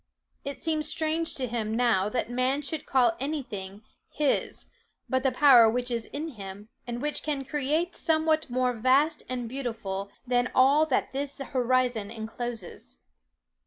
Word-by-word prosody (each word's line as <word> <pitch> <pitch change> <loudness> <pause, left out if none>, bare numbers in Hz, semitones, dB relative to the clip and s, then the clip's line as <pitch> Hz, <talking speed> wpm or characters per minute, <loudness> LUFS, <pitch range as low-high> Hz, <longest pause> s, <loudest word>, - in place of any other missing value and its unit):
It 280 -1 -5
seems 310 -2 -1
strange 320 +1 0
to 260 - -1
him 225 -2 -2
now 220 -5 +2
that 230 0 -1
man 255 +4 0
should 305 +2 -4
call 245 -4 +3
any 285 +2 -2
thing 200 -2 -8 0.3
his 295 -2 -1 0.4
but 260 -1 +1
the 265 0 +2
power 250 -4 +7
which 245 +2 -2
is 230 -2 -2
in 310 +3 -5
him, 205 -4 -9 0.2
and 240 +2 -4
which 300 0 -1
can 285 -3 -3
create 300 +5 -1
somewhat 315 -2 +1
more 250 0 +1
vast 265 +7 +2
and 250 -2 -3
beautiful 225 -6 -4 0.2
than 245 0 +1
all 280 +4 +5
that 265 - 0
this 280 +1 -3
horizon 250 -5 0
encloses. 225 -2 -6
255 Hz, 155 wpm, -27 LUFS, 230-290 Hz, 0.4 s, power